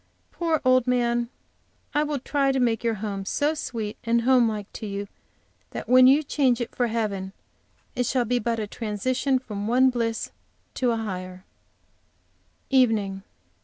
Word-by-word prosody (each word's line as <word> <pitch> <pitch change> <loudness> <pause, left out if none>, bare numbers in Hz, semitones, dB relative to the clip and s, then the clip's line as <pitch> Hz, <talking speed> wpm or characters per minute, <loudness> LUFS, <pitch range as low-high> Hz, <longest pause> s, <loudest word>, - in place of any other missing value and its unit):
poor 330 -3 0
old 255 -1 +4
man! 240 -1 +1 0.6
I 295 - +2
will 300 -1 -1
try 275 +1 +1
to 265 - 0
make 235 -2 +1
your 230 -1 +1
home 200 -2 -3
so 290 +9 0
sweet 225 -8 -4
and 235 0 +2
home 250 -2 +4
like 210 -2 -4
to 215 - -6
you 200 0 -4 0.6
that - - -7
when 255 +2 +7
you 280 +4 +5
change 265 -4 +1
it 240 - -4
for 245 - 0
heaven 205 -4 -2 0.6
it 245 -1 0
shall 250 -1 +1
be 245 +2 +1
but 230 0 -1
a 215 - -2
transition 245 +6 -1
from 210 -5 -5
one 255 +3 +4
bliss 230 -2 -2 0.4
to 250 - 0
a 230 - +1
higher! 185 -3 -6 1.3
EVENING. 220 -7 +2
235 Hz, 165 wpm, -25 LUFS, 215-255 Hz, 1.3 s, when